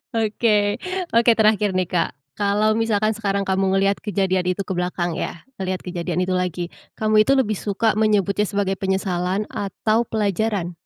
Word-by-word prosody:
Oke. 210 -2 +1 0.3
Oke 235 +1 +5
terakhir 215 -1 +3
nih, 185 - +1
Kak. 170 -2 0 0.2
Kalau 205 +1 +1
misalkan 220 -1 +1
sekarang 200 -2 -1
kamu 190 0 +1
ngelihat 195 +1 +2
kejadian 190 -3 0
itu 185 +2 0
ke - - -6
belakang 180 -1 -1
ya, 165 - -5 0.2
ngelihat 185 -1 -3
kejadian 175 0 -2
itu 185 - -2
lagi. 180 -1 -1 0.3
Kamu 215 0 +3
itu 275 +5 +3
lebih 215 -5 +2
suka 215 +2 0
menyebutnya 210 -1 +2
sebagai 200 -2 0
penyesalan, 190 0 -1
atau 215 +3 0
pelajaran? 205 -3 -1
200 Hz, 155 wpm, -22 LUFS, 185-215 Hz, 0.3 s, Oke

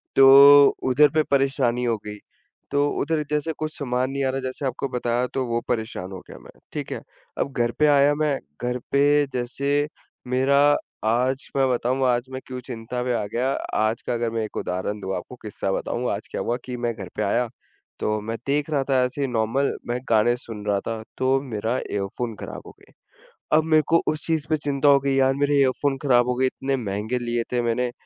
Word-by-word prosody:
तो 140 +1 +9 0.2
उधर 145 +3 +5
पे 155 0 +3
परेशानी 135 -3 +1
हो 115 -2 +1
गई। 105 0 -6 0.5
तो 145 0 +2
उधर 155 +1 0
जैसे 150 +2 0
कुछ 155 0 -4
सामान 130 -1 -1
नहीं 140 0 -2
आ - - +1
रहा 135 +1 -2
जैसे 130 +2 -4
आपको 130 +2 -2
बताया 120 0 0
तो 135 -1 -1
वो 115 0 0
परेशान 110 -5 -3
हो 95 - -7
गया - - -10
मैं, - - -15 0.2
ठीक - - -5
है। - - -4 0.4
अब 140 - -1
घर 120 -1 +1
पे 150 - +5
आया 145 0 +5
मैं, 150 -2 0 0.2
घर 125 +1 -1
पे 145 +1 +4
जैसे 140 +4 0 0.4
मेरा 130 +2 +2 0.5
आज 125 +4 +1
मैं 135 -1 +3
बताऊँ 130 +2 0
आज 120 0 +1
मैं 130 - -4
क्यों 130 -1 -6
चिंता 125 0 -5
में 125 0 0
आ 110 - -1
गया। 130 +3 +1 0.3
आज 110 +1 +1
का - - -3
अगर 120 -1 -1
मैं 115 -1 -1
एक 110 - -7
उदाहरण 95 +3 -3
दूँ 95 0 -3
आपको 90 +8 -7
किस्सा 100 -2 -3
बताऊँ, 125 +5 -2
आज 100 - -4
क्या - - -3
हुआ 120 - -1
कि 125 -1 -5
मैं 120 -1 -1
घर 95 -4 -8
पे 105 - -1
आया 120 +4 +1 0.5
तो 105 0 0
मैं 115 +2 -4
देख 145 +2 0
रहा 140 -3 +1
था 130 -1 +3
ऐसे 125 +3 -3
ही 135 - +1
नॉर्मल 120 +4 0 0.2
मैं 120 +1 -1
गाने 115 +2 +4
सुन 110 -4 -9
रहा 100 -1 +1
था 115 -1 -3 0.2
तो 130 +1 +2
मेरा 115 -2 -2
ईयरफ़ोन 105 +3 -3
खराब - - -7
हो - - -10
गए। - - -22 0.6
अब 160 - +3
मेरे 155 -1 +3
को 165 0 +4
उस 155 0 -1
चीज 160 -3 0
पे 155 - +2
चिंता 145 -1 +1
हो 140 -1 +6
गई 140 0 0
यार 135 0 +3
मेरे 145 0 +1
ईयरफ़ोन 135 +1 +1
खराब 125 -3 +4
हो 125 - +1
गए, 130 - +1
इतने 135 +1 -1
महँगे 110 +2 -2
लिए 120 -1 -1
थे 125 -1 +1
मैंने। 120 +1 0
125 Hz, 215 wpm, -24 LUFS, 115-140 Hz, 0.6 s, तो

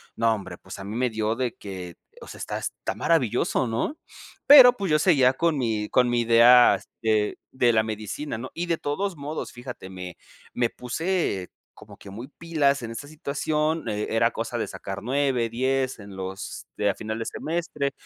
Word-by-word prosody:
No, 115 0 +2
hombre, 95 -4 -6
pues, 95 - -10
a - - -7
mí 100 +3 -6
me 125 +1 +1
dio 110 0 -1
de 125 -1 -2
que, 90 -4 -8 0.2
o - - -10
sea, - - -10
está - - -4
está - - -4
maravilloso, 130 -4 +1
¿no? 115 - -2 0.5
Pero, 260 -4 +10
pues, 200 -5 -3
yo 150 - +5
seguía 140 -6 +4
con 165 +3 +1
mi 110 -3 -1
con 125 -1 +3
mi 120 0 +2
idea, 120 +1 +7
este, 110 -2 -1
de 120 -2 +3
la 110 0 +3
medicina, 110 +5 -5
¿no? 130 - -6
Y 175 +1 -2
de 170 -1 0
todos 180 +6 -2
modos, 150 +2 -5
fíjate, 120 -6 -9
me 90 -2 -8 0.4
me 120 -1 +1
puse 125 - -2 0.3
como 105 -1 -14
que 100 - -13
muy 115 +6 -8
pilas 145 -3 0
en 115 - -6
esta 115 +5 -7
situación. 155 +1 -2
Eh, 105 0 -2
era - - +2
cosa - - -4
de - - -2
sacar 95 0 -7
9, 130 0 +1
10 130 +2 -1
en 100 -2 -11
los 95 0 -6
de 105 - +1
a - - -1
final 110 +1 -5
de 115 - -3
semestre 160 -3 -3
120 Hz, 195 wpm, -25 LUFS, 110-145 Hz, 0.5 s, Pero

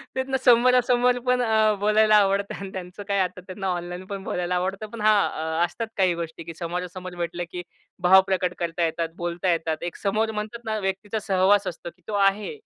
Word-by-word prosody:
त्यांना 265 0 -1
समोरासमोर 250 0 +4
पण 250 0 +3 0.4
बोलायला 215 +1 +4
आवडतं. 200 -1 +1
त्यांचं 185 +2 -7
काय 200 -1 +1
आता 185 -1 -1
त्यांना 190 +1 -6
ऑनलाईन 175 +1 -6
पण 195 -1 -6
बोलायला 180 -1 -2
आवडतं. 195 +4 -2
पण 230 - -6
हां, 170 -6 +2
असतात 230 +6 -5
काही 185 -3 +3
गोष्टी, 165 -1 -6
की 165 +1 -8
समोरासमोर 180 +2 -5
भेटलं 175 0 -3
की 180 - -5 0.4
भाव 190 +2 +8
प्रकट 185 -2 0
करता 170 0 -1
येतात, 165 0 -2
बोलता 175 +1 -1
येतात. 160 -1 -2
एक - - -22
समोर 215 +2 0
म्हणतात 220 +2 -6
ना, 220 -1 -1
व्यक्तीचा 195 +2 -3
सहवास 195 +1 +3
असतो, 170 0 -6
की 180 - -33
तो 215 - -5
आहे. 210 - -2
190 Hz, 180 wpm, -24 LUFS, 175-215 Hz, 0.4 s, भाव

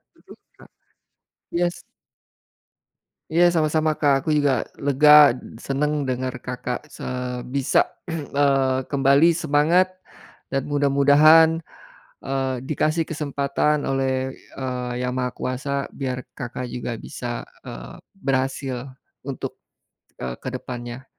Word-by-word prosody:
Mhm, - - -16 0.2
Kak. - - -17 0.9
Iya 175 +1 +2
s - - -12 1.5
Iya 170 +2 +5
sama-sama, 155 0 +2
Kak. 145 -2 +4
Aku 140 - -5
juga 140 -5 +1 0.2
lega, 150 +1 +8 0.3
senang 150 +2 0
dengar 130 -1 -2
Kakak 125 0 -4
se - - -10 0.5
bisa, 135 -1 +3 0.3
eee, 140 -4 +1
kembali 140 +4 +5
semangat 165 +3 +3 0.6
dan 135 -1 0
mudah-mudahan, 145 +3 +5 0.6
eee, 135 -1 -1
dikasih 155 +2 +1
kesempatan 145 0 0
oleh, 130 -1 -1 0.2
eee, 125 -2 -3
Yang 125 0 -1
Maha 125 0 -1
Kuasa 130 +2 -4 0.2
biar 130 -2 -4 0.2
Kakak 125 +1 -5
juga 120 -1 -4
bisa, 120 -1 -5 0.2
eee, 60 +1 -9 0.2
berhasil 135 -5 -2 0.4
untuk, - - -5 0.6
eee, 65 -1 -3
ke - - -6
depannya 125 0 -7
140 Hz, 110 wpm, -23 LUFS, 130-150 Hz, 1.5 s, lega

